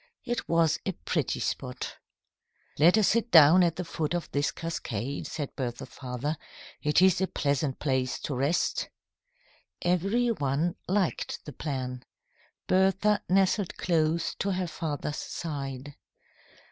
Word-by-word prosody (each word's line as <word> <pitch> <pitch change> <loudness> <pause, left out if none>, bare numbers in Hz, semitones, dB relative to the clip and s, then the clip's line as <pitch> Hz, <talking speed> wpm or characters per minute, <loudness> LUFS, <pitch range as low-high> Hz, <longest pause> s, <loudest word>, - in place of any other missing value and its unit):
It 240 -1 -3
was 165 -1 +3
a 195 - -2
pretty 160 -4 -2
spot. 125 -2 -4 0.8
"Let 170 +7 +6
us 215 - +4
sit 230 +1 +1
down 160 +1 +8
at 170 -2 +3
the 180 +2 -4
foot 165 0 -2
of 175 - -4
this 145 0 +1
cascade," 140 -6 -4
said 150 -3 -5
Bertha's 120 -2 -4
father. 130 +4 -4 0.4
"It 150 +4 +3
is 190 0 +4
a 190 - +2
pleasant 140 -3 -1
place 130 -3 0
to 145 - -3
rest." 140 +6 0 0.9
Every 195 +8 +2
one 155 - 0
liked 190 -1 -1
the 150 - -8
plan. 130 -3 -4 0.6
Bertha 195 +2 +3
nestled 190 +1 +2
close 165 -1 +1
to 200 0 0
her 185 0 -1
father's 150 -3 -4
side. 140 -3 -5
160 Hz, 135 wpm, -28 LUFS, 140-185 Hz, 0.9 s, down